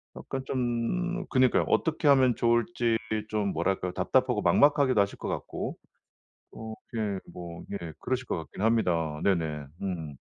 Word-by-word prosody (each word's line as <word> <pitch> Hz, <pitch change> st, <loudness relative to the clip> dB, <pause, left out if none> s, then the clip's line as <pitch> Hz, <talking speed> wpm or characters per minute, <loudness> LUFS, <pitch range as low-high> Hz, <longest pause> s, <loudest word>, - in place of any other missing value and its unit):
약간 135 Hz, -1 st, -5 dB
좀 135 Hz, +10 st, -1 dB
그니까요. 130 Hz, -2 st, +3 dB
어떻게 155 Hz, -2 st, +1 dB
하면 130 Hz, -4 st, +5 dB
좋을지 120 Hz, 0 st, +2 dB, 0.3 s
좀 105 Hz, -2 st, 0 dB
뭐랄까요, 90 Hz, +2 st, -1 dB
답답하고 -, -, +1 dB
막막하기도 140 Hz, -5 st, +4 dB
하실 100 Hz, 0 st, -1 dB
것 -, -, -6 dB
같고. -, -, -4 dB, 0.8 s
어 110 Hz, 0 st, -7 dB, 0.2 s
예. 100 Hz, -3 st, -1 dB
뭐 85 Hz, -1 st, -8 dB
예. 85 Hz, -5 st, -5 dB
그러실 130 Hz, 0 st, -2 dB
것 -, -, -1 dB
같긴 80 Hz, +3 st, -7 dB
합니다. 85 Hz, -9 st, +1 dB
네네. 80 Hz, -6 st, 0 dB, 0.2 s
음. 80 Hz, -7 st, -4 dB
110 Hz, 290 characters per minute, -28 LUFS, 90-130 Hz, 0.8 s, 하면